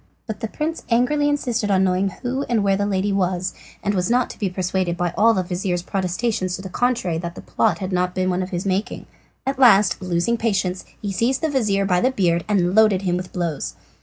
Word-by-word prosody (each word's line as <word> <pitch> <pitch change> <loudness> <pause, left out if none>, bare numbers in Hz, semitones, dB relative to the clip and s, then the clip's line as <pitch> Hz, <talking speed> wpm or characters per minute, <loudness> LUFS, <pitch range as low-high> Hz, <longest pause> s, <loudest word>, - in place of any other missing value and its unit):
But 220 - -5
the 225 - -3
prince 315 +8 -3
angrily 290 +5 +2
insisted 245 -7 -1
on 190 -1 +3
knowing 190 +1 +1
who 250 +7 -4
and 230 -4 +2
where 195 -1 +3
the 205 +1 0
lady 200 0 0
was, 185 -1 0 0.3
and 205 - 0
was 180 +1 0
not 245 +1 +2
to - - -13
be 200 - 0
persuaded 180 -1 -1
by 175 0 -1
all 225 +1 +4
the 185 - +1
vizir's 175 0 -2
protestations 185 0 -1
to 190 - -8
the 190 - -6
contrary 225 -6 0
that 170 +1 -5
the - - -8
plot - - +1
had 190 -1 -4
not 180 0 0
been 185 0 +1
one 180 +1 0
of 185 - -4
his 180 0 -3
making. 195 +2 -2 0.4
At 270 0 -2
last, 205 -8 +5
losing 185 +6 0
patience, 195 -5 -1 0.2
he 200 - -2
seized 240 +7 0
the 320 - +1
vizir 210 -7 +1
by 180 -2 +2
the 255 - +3
beard 175 -8 +1
and 185 -4 +2
loaded 210 -3 +4
him 180 -2 +1
with 180 0 -5
blows. 160 - -3
195 Hz, 225 wpm, -22 LUFS, 180-230 Hz, 0.4 s, last